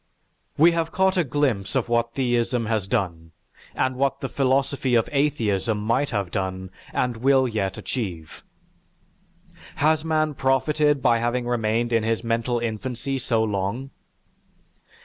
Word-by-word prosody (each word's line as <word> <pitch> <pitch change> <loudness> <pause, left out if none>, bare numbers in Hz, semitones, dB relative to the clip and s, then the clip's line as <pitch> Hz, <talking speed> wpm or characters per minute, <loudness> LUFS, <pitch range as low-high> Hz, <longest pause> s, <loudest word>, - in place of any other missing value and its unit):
We 165 +4 +6
have 165 -1 -1
caught 190 0 +2
a 180 - +3
glimpse 130 -7 -1
of 130 -3 +1
what 115 0 0
theism 120 -2 0
has 110 -3 -1
done, 85 -8 -2 0.4
and 130 0 0
what 135 +1 0
the 135 - -4
philosophy 135 -1 +1
of 115 - +3
atheism 115 -8 0
might 115 +7 0
have 100 -5 -2
done, 95 -1 -3 0.2
and 125 -2 -1
will 130 +2 +3
yet 100 -5 -2
achieve. 90 - -5 1.3
Has 155 +1 +2
man 155 -1 +1
profited 145 +1 +1
by 115 -1 +4
having 120 +1 -1
remained 120 0 0
in 115 - +3
his 115 +1 -1
mental 115 +1 0
infancy 120 +3 -3
so 115 -3 +1
long? 105 +6 -2
120 Hz, 140 wpm, -24 LUFS, 110-135 Hz, 1.3 s, We